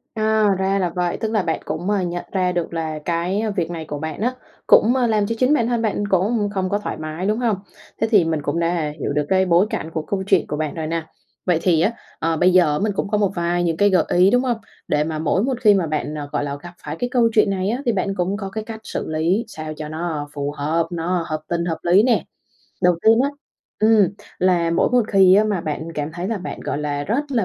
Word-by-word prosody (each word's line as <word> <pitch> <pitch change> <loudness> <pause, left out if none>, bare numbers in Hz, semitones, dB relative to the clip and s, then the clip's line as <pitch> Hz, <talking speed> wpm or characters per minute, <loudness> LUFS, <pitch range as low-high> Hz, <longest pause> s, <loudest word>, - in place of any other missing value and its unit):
À, 220 -1 +2
ra 190 +1 +1
là 180 -2 +1
vậy, 175 -1 -1
tức 220 -1 -3
là 215 - +2
bạn 165 -3 -1
cũng, 175 +5 -3
ờ, 205 -2 +1
nhận 175 -1 -3
ra 185 -2 +1
được 175 -1 -3
là 160 -2 -3
cái 175 +5 -1
việc 170 -4 -1
này 165 -2 -5
của 150 -1 -5
bạn 160 +4 -5
á 245 +3 +1 0.3
cũng, 235 +4 +6
ơ, 250 -2 +2
làm 210 -2 +1
cho 230 - -2
chính 255 +3 +4
bản 235 -6 +2
thân 235 -1 0
bạn 210 -2 -1
cũng 205 +3 +1
không 190 -2 -1
có 205 - 0
thoải 210 - -5
mái, 155 +3 -5
đúng 215 +3 +1
hông? 235 -4 +1 0.5
Thế 225 - +3
thì 205 -5 +6
mình 160 -2 -1
cũng 145 +3 -2
đã 165 -3 0
hiểu 145 - -2
được 150 0 0
cái 190 0 +3
bối 180 +3 +4
cảnh 160 - -4
của 160 - -2
câu 190 +4 -3
chuyện - - +3
của 150 - -3
bạn 155 -1 -2
rồi 160 -2 -3
nè. 165 0 -2 0.4
Vậy 175 -3 +2
thì 165 -3 +3
á, 205 - +3 0.3
ờ, 165 0 0
bây 180 +2 +4
giờ 175 -5 +5
á 150 - -1
mình 210 +1 0
cũng 200 - -2
có 210 - +1
một 200 -2 +1
vài 175 0 0
những 165 -2 0
cái 205 +3 +4
gợi 185 -4 +3
ý, 180 +2 +4
đúng 245 +1 +3
hông? 245 -3 0 0.3
Để 150 0 +2
mà 155 0 -3
mỗi 165 +6 +1
một 255 -2 -1
khi 210 -3 +6
mà 185 -5 +1
bạn, 150 0 -2 0.2
gọi - - -1
là, 140 0 -4
gặp 175 0 -9
phải 150 +1 -4
cái 245 - -1
câu 240 -2 +3
chuyện 215 -1 +4
này 190 0 -1
á 245 +5 -1
thì 240 - +3
bạn 195 -1 -1
cũng 190 +2 -1
có 195 -2 -5
cái 220 +2 -5
cách 220 0 -8
xử - - -4
lý 165 +8 0
sao 155 -7 -7
cho 150 0 -7
nó 155 -2 -4
phù 145 0 -3
hợp, 155 +3 -1
nó 175 +1 -1
hợp 155 -1 -2
tình 170 0 -1
hợp 165 -2 -2
lý 180 +4 +5
nè. 245 -1 +2 0.6
Đầu 180 -1 +4
tiên 225 +1 +5
á, 275 - +2 0.5
ừm, 215 -3 +5 0.3
là 175 -2 +2
mỗi 170 - +2
một 250 -1 +5
khi 190 -2 +6
á 210 +2 +5
mà 205 -4 0
bạn 155 0 -4
cảm 150 +1 -3
thấy 175 +2 -4
là 225 - -1
bạn, 185 - -6
gọi - - -3
là, 145 -1 -2
rất 240 - 0
là 235 -6 +1
180 Hz, 270 wpm, -21 LUFS, 160-210 Hz, 0.6 s, cũng